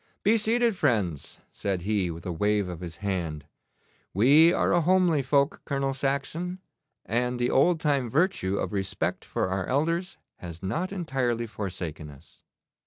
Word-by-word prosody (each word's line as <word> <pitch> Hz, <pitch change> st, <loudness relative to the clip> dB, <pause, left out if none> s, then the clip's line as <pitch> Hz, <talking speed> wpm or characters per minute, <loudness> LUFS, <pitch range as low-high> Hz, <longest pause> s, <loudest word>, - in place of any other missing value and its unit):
'Be 215 Hz, +3 st, +4 dB
seated, 230 Hz, +1 st, +2 dB
friends,' 105 Hz, -, -1 dB
said 95 Hz, -3 st, -2 dB
he, 100 Hz, -3 st, 0 dB
with 85 Hz, +1 st, -8 dB
a 90 Hz, -, -2 dB
wave 105 Hz, +3 st, +1 dB
of 90 Hz, -2 st, -6 dB
his 85 Hz, -2 st, -7 dB
hand; 85 Hz, -6 st, -2 dB, 0.7 s
'we 145 Hz, -, +6 dB
are -, -, +1 dB
a 175 Hz, -, +4 dB
homely 175 Hz, -3 st, +3 dB
folk, 140 Hz, +2 st, +1 dB
Colonel 135 Hz, -1 st, -1 dB
Saxon, 140 Hz, +7 st, -2 dB, 0.5 s
and 125 Hz, +2 st, 0 dB
the 120 Hz, 0 st, 0 dB
old 165 Hz, +5 st, +4 dB
time 140 Hz, -6 st, +1 dB
virtue 135 Hz, -, +1 dB
of -, -, -3 dB
respect 95 Hz, -1 st, -2 dB
for -, -, -2 dB
our 95 Hz, -1 st, -2 dB
elders 165 Hz, +7 st, 0 dB, 0.2 s
has 85 Hz, 0 st, -9 dB
not 165 Hz, -, -2 dB
entirely 130 Hz, -, -1 dB
forsaken 90 Hz, -8 st, -6 dB
us. 70 Hz, +2 st, -17 dB
125 Hz, 155 wpm, -27 LUFS, -, 0.7 s, we